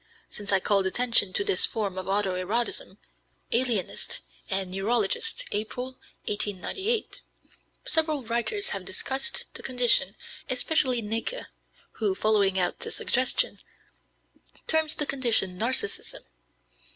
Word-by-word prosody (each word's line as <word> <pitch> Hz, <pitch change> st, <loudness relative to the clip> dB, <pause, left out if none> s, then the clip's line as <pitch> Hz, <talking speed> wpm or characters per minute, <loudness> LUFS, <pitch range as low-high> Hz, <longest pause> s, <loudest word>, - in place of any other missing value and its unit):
Since 205 Hz, -1 st, -3 dB
I 195 Hz, -, +5 dB
called 195 Hz, 0 st, +2 dB
attention 230 Hz, -2 st, +3 dB
to -, -, +4 dB
this 400 Hz, -1 st, +5 dB
form 205 Hz, -4 st, -3 dB
of 185 Hz, -, -6 dB
auto 195 Hz, -1 st, +2 dB
erotism 205 Hz, +6 st, -1 dB, 0.6 s
(Alienist 235 Hz, -6 st, +1 dB, 0.3 s
and 190 Hz, -1 st, -1 dB
Neurologist, 450 Hz, -, 0 dB
April, 250 Hz, +5 st, -3 dB, 0.3 s
1898), 295 Hz, -, -1 dB, 0.6 s
several 310 Hz, -4 st, +1 dB
writers 240 Hz, -, -1 dB
have -, -, -3 dB
discussed 270 Hz, +13 st, -2 dB
the -, -, -8 dB
condition, 245 Hz, -6 st, +3 dB, 0.3 s
especially 255 Hz, -2 st, +1 dB
Näcke, 225 Hz, -, -2 dB, 0.5 s
who, 205 Hz, -4 st, +1 dB
following 200 Hz, -2 st, +2 dB
out 180 Hz, -1 st, 0 dB
the -, -, -3 dB
suggestion, -, -, +1 dB, 1.1 s
terms 315 Hz, -1 st, +2 dB
the 295 Hz, -, 0 dB
condition 230 Hz, -10 st, +1 dB
Narcissism. 230 Hz, -3 st, -1 dB
230 Hz, 115 wpm, -27 LUFS, 200-270 Hz, 1.1 s, I